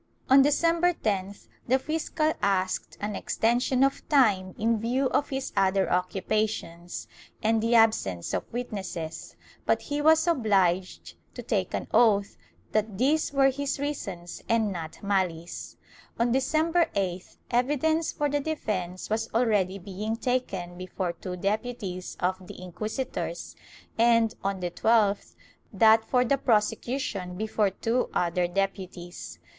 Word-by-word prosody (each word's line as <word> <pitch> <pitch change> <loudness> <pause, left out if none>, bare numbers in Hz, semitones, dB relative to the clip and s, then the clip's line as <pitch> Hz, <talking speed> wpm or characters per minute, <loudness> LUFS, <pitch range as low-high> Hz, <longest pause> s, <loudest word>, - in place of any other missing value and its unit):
On 270 +1 +9
Decem 330 +4 +2
ber 355 0 +4
10th, 200 - -3 0.2
the 255 +2 +4
fiscal 310 +2 -1
asked 190 -2 0
an 205 0 -2
extension 245 +5 +1
of 275 +4 0
time 205 -11 +3
in 225 0 +1
view 255 +4 0
of 290 - +1
his 270 -1 -4
other 195 -1 +2
occupations 180 -1 -2 0.4
and 220 0 +2
the 230 +1 +2
absence 215 - +2
of - - -3
witnesses, 190 -9 -5 0.3
but - - +1
he 290 0 -2
was 315 +2 +5
obliged 195 - +1 0.2
to - - -6
take - - -1
an - - -4
oath 205 -4 +4 0.4
that 215 -2 0
these 290 +7 +2
were 270 -1 +4
his 280 +1 -2
reasons 195 -12 -5
and 225 -2 +2
not 165 -1 -7
malice. 180 -4 -2 0.4
On 235 +1 +2
December 315 +6 +2
8th 185 -2 -3
evidence 295 +6 +1
for 295 - -1
the 290 0 0
defence 200 - -3
was 220 +1 -1
already 205 -5 +2
being 200 +4 -4
taken 195 -8 -2
before 185 -1 -3
two 180 +2 -6
deputies 200 -2 -3
of 185 0 -1
the - - -10
inquisitors 215 - -4 0.4
and, 230 -1 +4
on 195 -1 -2
the 175 -1 -2
12th, 210 -1 +2 0.4
that 220 +2 +5
for 250 +2 +2
the 275 +3 +1
prosecution 215 -4 0
before 215 -1 +1
two 230 +6 -1
other 175 0 +1
deputies. 175 - -4
215 Hz, 135 wpm, -27 LUFS, 185-255 Hz, 0.4 s, On